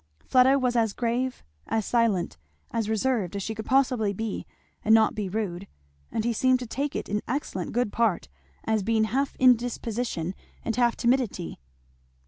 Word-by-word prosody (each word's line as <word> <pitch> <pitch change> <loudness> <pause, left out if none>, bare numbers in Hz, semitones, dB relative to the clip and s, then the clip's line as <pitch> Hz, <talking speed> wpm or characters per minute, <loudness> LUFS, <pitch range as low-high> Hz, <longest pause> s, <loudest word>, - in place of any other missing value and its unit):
Fleda 260 +2 +5
was 250 -2 0
as 225 -3 +2
grave, 245 +2 -1 0.2
as 220 -2 0
silent, 215 - +1 0.3
as 225 -2 -1
reserved, 220 -4 0
as 200 - -2
she 220 - -3
could 220 0 -7
possibly 250 -6 +2
be 220 +1 -4 0.4
and 220 +1 +6
not 220 -1 +4
be 205 -3 -3
rude; 200 -2 -3 0.4
but 220 - -1
he 235 +1 +1
seemed 255 +3 +3
to 250 - -6
take 280 +5 -3
it - - -3
in 210 +1 -1
excellent 235 - -3
good 245 -2 0
part, 225 - +1 0.4
as 220 -1 +1
being 220 +2 +2
half 270 +5 0
indisposition 235 -7 +1 0.3
and 225 - -1
half 240 -1 +3
timidity. 240 - 0
225 Hz, 165 wpm, -26 LUFS, 210-250 Hz, 0.4 s, and